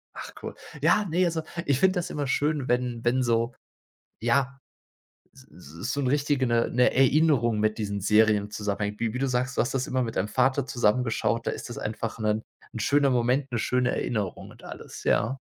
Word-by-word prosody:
Ach -, -, -7 dB
cool. -, -, -6 dB, 0.3 s
Ja, 210 Hz, -, +3 dB
ne, 180 Hz, +3 st, +2 dB
also, 165 Hz, -2 st, -1 dB, 0.2 s
ich 140 Hz, -2 st, +1 dB
finde 190 Hz, +3 st, +4 dB
das 175 Hz, -, -4 dB
immer 145 Hz, -2 st, -3 dB
schön, 145 Hz, 0 st, 0 dB
wenn 125 Hz, -1 st, -1 dB
wenn 130 Hz, +2 st, +2 dB
so 115 Hz, 0 st, +1 dB, 0.7 s
ja, 135 Hz, +3 st, +1 dB, 0.7 s
s -, -, -17 dB, 0.3 s
s 120 Hz, -, -2 dB
so 145 Hz, -, -1 dB
'n 135 Hz, -, -1 dB
richtige 140 Hz, 0 st, +1 dB
'ne 115 Hz, -1 st, +2 dB
'ne 125 Hz, +1 st, +3 dB
Erinnerung 135 Hz, -4 st, +3 dB
mit 110 Hz, +1 st, 0 dB
diesen 100 Hz, -2 st, -3 dB
Serien 105 Hz, 0 st, +3 dB
zusammenhängt. 105 Hz, 0 st, -3 dB
Wie 115 Hz, -2 st, 0 dB
wie 125 Hz, -, -4 dB
du 135 Hz, -, 0 dB
sagst, 125 Hz, 0 st, -1 dB
du -, -, +2 dB
hast 125 Hz, -, -1 dB
das 130 Hz, -1 st, 0 dB
immer 130 Hz, 0 st, 0 dB
mit 115 Hz, -2 st, -4 dB
deinem 100 Hz, -, 0 dB
Vater 130 Hz, +3 st, +1 dB
zusammen 125 Hz, -2 st, +2 dB
geschaut, 115 Hz, 0 st, -1 dB
da -, -, +1 dB
ist -, -, -6 dB
das 120 Hz, -, -7 dB
einfach 110 Hz, +1 st, -4 dB
'nen 105 Hz, 0 st, 0 dB, 0.3 s
'n -, -, -6 dB
schöner 140 Hz, +5 st, +3 dB
Moment, 125 Hz, +2 st, +1 dB
'ne 120 Hz, -, -1 dB
schöne 125 Hz, +2 st, +1 dB
Erinnerung 105 Hz, -6 st, -3 dB
und -, -, -17 dB
alles, -, -, -9 dB
ja. 125 Hz, +5 st, +1 dB
125 Hz, 205 wpm, -26 LUFS, 110-135 Hz, 0.7 s, finde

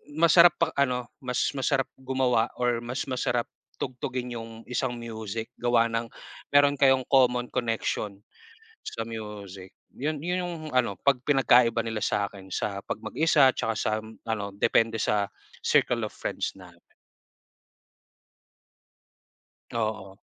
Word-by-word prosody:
masarap 170 Hz, +2 st, +7 dB
pa 165 Hz, -, +2 dB
ano, 125 Hz, -3 st, +1 dB, 0.2 s
mas 125 Hz, -1 st, 0 dB
masarap 135 Hz, 0 st, +1 dB
gumawa, 130 Hz, -3 st, +1 dB
or 120 Hz, -1 st, +1 dB
mas 125 Hz, +3 st, -3 dB
masarap 125 Hz, -2 st, -1 dB, 0.3 s
tugtugin 125 Hz, -1 st, -4 dB
yung 115 Hz, 0 st, -8 dB
isang 125 Hz, 0 st, -1 dB
music 110 Hz, -1 st, -5 dB
gawa 120 Hz, -1 st, +3 dB
ng 115 Hz, 0 st, -1 dB, 0.5 s
meron 145 Hz, 0 st, +5 dB
kayong 135 Hz, -2 st, +5 dB
common 125 Hz, -2 st, +4 dB
connection 115 Hz, -4 st, -2 dB, 0.6 s
sa 115 Hz, -, -5 dB
music 100 Hz, -4 st, -8 dB, 0.2 s
yun 150 Hz, +3 st, -2 dB
yun 180 Hz, +1 st, 0 dB
yung 175 Hz, -1 st, -4 dB, 0.2 s
ano 120 Hz, -6 st, +2 dB
pag 140 Hz, -3 st, +2 dB
pinagkaiba 120 Hz, -4 st, +4 dB
nila 110 Hz, -1 st, -3 dB
sakin 100 Hz, -2 st, -2 dB
sa 100 Hz, +1 st, -2 dB
pag -, -, -4 dB
mag-isa 150 Hz, -5 st, +4 dB
tsaka 115 Hz, -, -1 dB
sa 110 Hz, -, 0 dB
ano 110 Hz, -1 st, -5 dB
depende 115 Hz, +2 st, +2 dB
sa 100 Hz, -2 st, +1 dB, 0.3 s
circle -, -, +2 dB
of -, -, -15 dB
friends -, -, -3 dB
natin. 90 Hz, -2 st, -15 dB, 2.9 s
Oo. 110 Hz, -4 st, -3 dB
120 Hz, 125 wpm, -27 LUFS, 110-130 Hz, 2.9 s, masarap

